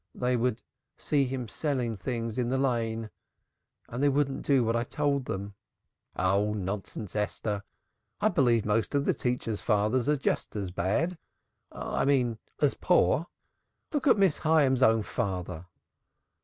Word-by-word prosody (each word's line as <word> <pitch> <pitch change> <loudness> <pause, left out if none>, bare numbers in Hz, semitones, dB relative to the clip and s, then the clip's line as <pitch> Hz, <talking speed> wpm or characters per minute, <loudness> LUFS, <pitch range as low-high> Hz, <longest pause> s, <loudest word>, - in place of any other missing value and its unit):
"They 125 0 +1
would 120 -1 0 0.3
see 145 -2 +1
him 125 -2 -4
selling 125 -1 -2
things 115 +3 -3
in 120 -1 0
the 130 - +1
Lane 115 -4 -1 0.8
and 120 +3 -5
they 145 - +4
wouldn't 140 -1 0
do 135 -3 +3
what 115 0 +1
I 115 - +1
told 140 0 -1
them." 100 -1 -4 0.6
"Nonsense, 100 +1 -1
Esther. 105 -1 -2 0.6
I 215 - +3
believe 120 - +3
most 110 +6 0
of 140 0 +2
the - - +3
teachers' 120 -4 -2
fathers 110 +5 +1
are 150 - +3
just 135 - -2
as 100 -4 -3
bad 145 - 0 0.5
I - - -2
mean 125 -5 +2 0.2
as - - +3
poor. 145 - +2 0.7
Look 290 -1 0
at 255 - +6
Miss 195 -6 +3
Hyams's 145 -5 +3
own 115 -3 +5
father." 90 -4 -3
120 Hz, 145 wpm, -29 LUFS, 105-140 Hz, 0.8 s, at